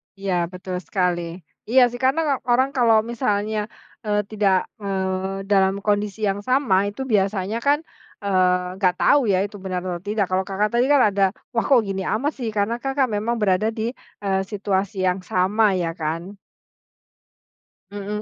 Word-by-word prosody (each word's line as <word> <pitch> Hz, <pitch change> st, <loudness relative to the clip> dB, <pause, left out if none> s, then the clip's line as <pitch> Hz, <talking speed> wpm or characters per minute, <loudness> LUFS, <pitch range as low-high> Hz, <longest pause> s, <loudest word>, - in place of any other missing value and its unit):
Ya 185 Hz, -3 st, -1 dB
betul 185 Hz, 0 st, -6 dB
sekali. 175 Hz, -2 st, -2 dB, 0.2 s
Iya 255 Hz, +3 st, +5 dB
sih 245 Hz, -, -7 dB
karena 275 Hz, +1 st, +1 dB
orang 260 Hz, +3 st, +3 dB
kalau 230 Hz, -5 st, +4 dB
misalnya, 215 Hz, -3 st, -1 dB, 0.4 s
eee, 210 Hz, 0 st, +1 dB
tidak, 195 Hz, -3 st, +1 dB
eee, 190 Hz, -1 st, -2 dB
dalam 195 Hz, 0 st, +3 dB
kondisi 210 Hz, 0 st, -1 dB
yang 200 Hz, -1 st, +1 dB
sama 205 Hz, -4 st, +2 dB
itu 205 Hz, +6 st, -5 dB
biasanya 200 Hz, -2 st, 0 dB
kan, 285 Hz, +5 st, +2 dB, 0.4 s
eee, 180 Hz, -2 st, +1 dB
nggak 185 Hz, -3 st, +3 dB
tahu 280 Hz, -5 st, +4 dB
ya 190 Hz, -2 st, +2 dB
itu 205 Hz, 0 st, -7 dB
benar 185 Hz, -2 st, -4 dB
atau 180 Hz, -2 st, -3 dB
tidak, 205 Hz, +2 st, -1 dB
kalau 190 Hz, 0 st, 0 dB
Kakak 205 Hz, +2 st, 0 dB
tadi 240 Hz, +2 st, +3 dB
kan 285 Hz, -1 st, +5 dB
ada, 200 Hz, 0 st, +1 dB, 0.3 s
"Wah, 230 Hz, -, 0 dB
kok 255 Hz, -5 st, +5 dB
gini 195 Hz, -2 st, -3 dB
amat 280 Hz, +8 st, 0 dB
sih?" 240 Hz, -, -3 dB
Karena 210 Hz, +3 st, 0 dB
Kakak 270 Hz, -1 st, 0 dB
memang 215 Hz, +3 st, -1 dB
berada 205 Hz, +1 st, +2 dB
di, 225 Hz, +1 st, -2 dB, 0.3 s
eee, 190 Hz, -1 st, +1 dB
situasi 195 Hz, -1 st, -2 dB
yang 180 Hz, 0 st, +1 dB
sama 190 Hz, +3 st, +2 dB
ya 175 Hz, -2 st, -1 dB
kan? 165 Hz, +4 st, -5 dB, 1.5 s
Mhm 205 Hz, +1 st, -4 dB
200 Hz, 160 wpm, -22 LUFS, 190-225 Hz, 1.5 s, Iya